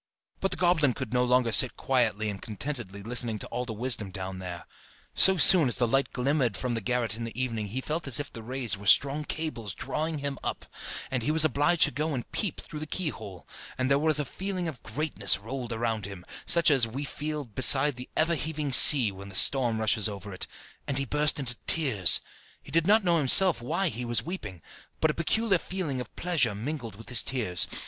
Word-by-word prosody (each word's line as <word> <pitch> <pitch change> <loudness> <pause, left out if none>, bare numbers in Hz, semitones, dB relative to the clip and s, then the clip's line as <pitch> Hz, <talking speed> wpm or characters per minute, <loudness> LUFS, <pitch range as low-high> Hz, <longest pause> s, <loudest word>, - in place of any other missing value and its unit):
But 195 - -2
the - - -4
goblin 160 -8 +1
could 130 -3 -7
no 125 0 +1
longer 125 -1 +1
sit 120 +4 +5
quietly 110 -5 -1
and 100 - -10
contentedly 110 -3 -6
listening 115 -1 -3
to - - -8
all 125 +1 -4
the 120 - -7
wisdom 110 -3 -3
down 95 0 -7
there: 90 -2 -8 0.5
so 190 0 +8
soon 170 0 +7
as 120 - -1
the 120 - 0
light 135 +4 -1
glimmered 135 -1 -1
from 125 -2 -4
the 115 - -4
garret 120 0 -2
in 115 - -7
the 115 +1 -7
evening 115 -5 -3
he 125 +6 -5
felt 155 +3 -5
as 135 +1 +3
if 145 - -7
the 115 - -9
rays 120 -2 -4
were 100 +1 -11
strong 140 +6 +3
cables 120 - -5
drawing 155 +5 -4
him 140 -2 -5
up, - - -5 0.5
and 130 -2 -2
he 115 - -2
was 155 0 +4
obliged 155 +3 +2
to - - +3
go 150 +3 -3
and 120 - -7
peep 200 -9 -2
through 150 - -9
the 155 - -7
keyhole; 110 - -6 0.3
and 130 +1 -2
there 145 +3 +1
a - - +2
feeling 185 +2 -5
of 140 -7 -8
greatness 120 - 0
rolled 120 +4 -7
around 115 -3 -3
him, 95 -3 -11 0.2
such 170 -2 +5
as 130 -5 +3
we 130 +6 -6
feel 150 +1 -6
beside 135 +4 +4
the 125 +1 -9
ever 165 +2 +1
heaving 155 -2 -3
sea 125 -3 +9
when 100 +1 -11
the 95 - -9
storm 120 +1 +3
rushes 110 0 +1
over 100 -1 -9
it, 90 - -4 0.4
and 140 - -3
he 140 - +1
burst 150 +2 +2
into 125 -3 -4
tears! 125 - +2 0.4
He - - -14
did 165 +1 0
not 215 +1 +3
know 170 -2 +1
himself 155 +2 +6
why 170 +9 -2
he 125 -3 -5
was 120 +1 -2
weeping, 105 - -8 0.4
but 160 - +1
a - - -9
peculiar 195 +4 0
feeling 165 -10 -5
of 125 - -10
pleasure 145 - 0
mingled 115 -1 -6
with 115 +2 -13
his 125 -2 +5
tears. 110 -9 0
130 Hz, 215 wpm, -26 LUFS, 110-150 Hz, 0.5 s, sea